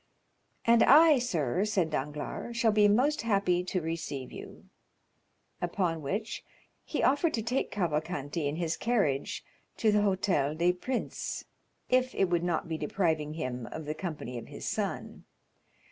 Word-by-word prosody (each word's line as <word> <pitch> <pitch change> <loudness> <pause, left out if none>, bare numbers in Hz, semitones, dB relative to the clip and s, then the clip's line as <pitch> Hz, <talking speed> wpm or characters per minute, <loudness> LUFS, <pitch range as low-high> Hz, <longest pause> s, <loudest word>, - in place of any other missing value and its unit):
"And 230 0 +5
I, 305 0 +7
sir," 180 - 0
said 195 -6 0
Danglars, 150 - -4
"shall 230 -2 +4
be 210 0 +5
most 260 +9 +3
happy 195 -5 +1
to 185 0 -1
receive 160 -5 -4
you." - - -10 1.0
Upon 175 -2 -1
which 200 +10 -3 0.4
he - - -2
offered 290 +5 +3
to 225 - -2
take 250 +4 -1
Cavalcanti 155 -4 -2
in 145 - -2
his 170 -1 -1
carriage 200 - 0 0.3
to 220 - +3
the 210 - +4
Hôtel 190 -7 +1
des 175 +2 +3
Princes, 245 +8 -4 0.4
if 255 0 +2
it 190 -2 +1
would 175 -1 +2
not 175 -2 -1
be 160 -1 -3
depriving 155 -2 0
him 125 -6 -4
of 160 - -7
the 150 - -2
company 155 -8 -5
of - - -11
his - - -8
son. - - -3
180 Hz, 150 wpm, -30 LUFS, 155-215 Hz, 1.0 s, I